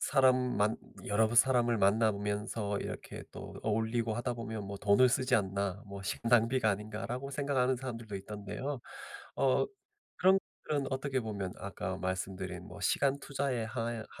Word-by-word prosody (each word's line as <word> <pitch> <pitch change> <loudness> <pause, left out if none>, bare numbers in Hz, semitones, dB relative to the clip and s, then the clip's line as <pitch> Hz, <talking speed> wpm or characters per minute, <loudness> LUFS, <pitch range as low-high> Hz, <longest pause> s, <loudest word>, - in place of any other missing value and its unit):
사람 130 -1 +5 0.2
만 105 +2 +2 0.3
여러 110 +2 +2
사람을 120 -2 +5
만나 110 +3 +4
보면서 105 0 -2
이렇게 - - -6
또 - - -8
어울리고 110 +1 0
하다 120 +1 -1
보면 110 -2 -5
뭐 100 - -5
'돈을 105 +6 +5
쓰지 130 0 +2
않나. 100 0 0
뭐 100 0 -7
시간 105 +3 -2
낭비가 120 0 +4
아닌가.'라고 110 +6 -4
생각하는 135 -2 +1
사람들도 115 -5 -5
있던데요. 105 +7 -5 0.6
어 135 - +3 0.5
그런 190 +1 +6 0.3
것들은 145 -3 0
어떻게 130 0 -1
보면 100 -5 -3
아까 95 -1 -4
말씀드린 95 -1 -3
뭐 100 - -10
시간 135 +7 +2
투자의 135 -5 -1
하나 115 -1 -3
110 Hz, 340 characters per minute, -32 LUFS, 100-130 Hz, 0.6 s, 그런